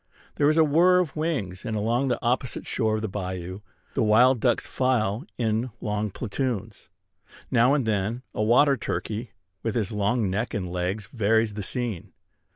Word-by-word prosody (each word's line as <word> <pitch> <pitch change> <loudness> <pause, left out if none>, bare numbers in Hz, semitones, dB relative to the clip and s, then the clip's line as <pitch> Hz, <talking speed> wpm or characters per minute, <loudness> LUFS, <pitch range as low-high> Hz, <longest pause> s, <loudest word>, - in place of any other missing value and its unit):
There 145 - +4
is 155 - +2
a 160 - +7
whir 170 +5 +5
of 180 -5 0
wings; 135 - -2
and 110 - -3
along 120 +6 +1
the 125 - +1
opposite 125 +1 -1
shore 110 -3 0
of 110 - -3
the - - 0
bayou 95 -2 -5 0.3
the - - 0
wild 120 +4 +5
ducks 120 -2 +2
file 120 -2 0
in 115 +1 0
long 105 0 -2
platoons. 110 -1 -4 0.6
Now 125 +2 +4
and 140 -5 0
then 110 +3 -1
a - - -2
water 135 +6 +5
turkey, 110 +1 -4 0.3
with 115 - -2
his 110 -4 0
long 105 +2 +1
neck 105 +6 -2
and 95 -3 -2
legs, 90 +4 -2
varies 110 -1 +1
the 105 - -4
scene. 115 -3 -4
110 Hz, 170 wpm, -26 LUFS, 105-125 Hz, 0.6 s, a